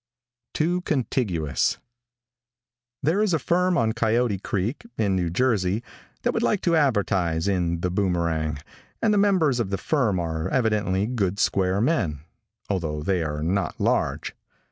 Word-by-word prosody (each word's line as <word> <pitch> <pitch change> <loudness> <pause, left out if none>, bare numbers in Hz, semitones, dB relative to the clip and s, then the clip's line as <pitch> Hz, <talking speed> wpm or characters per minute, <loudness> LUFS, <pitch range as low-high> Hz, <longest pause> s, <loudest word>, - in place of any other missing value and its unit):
TOO 175 +3 +1
CONTIGUOUS. 115 - 0 1.3
|THERE 165 +9 +2
is 205 -6 +2
a - - +3
firm 175 +6 +1
on 110 -1 +2
Coyote 115 -2 +1
creek, 105 - -2
in 100 -3 +1
New 90 -2 0
Jersey, 105 0 +1 0.4
that - - +1
would - - 0
like 205 - +1
to 170 -2 +2
advertise 95 - +1
in 85 -3 0
The 90 - -1
Boomerang, 85 -5 0 0.4
and 220 -2 +2
the 205 - +3
members 180 -11 +3
of 110 -5 -1
the 100 - -1
firm 110 - +1
are 80 -1 -2
evidently 105 -6 +1
good 100 -5 -1
square 95 -1 +1
men, 100 - 0 0.5
although 80 -6 -2
they 90 +1 +1
are 75 -1 -3
not 90 +1 -1
large. - - 0
100 Hz, 145 wpm, -24 LUFS, 90-130 Hz, 1.3 s, a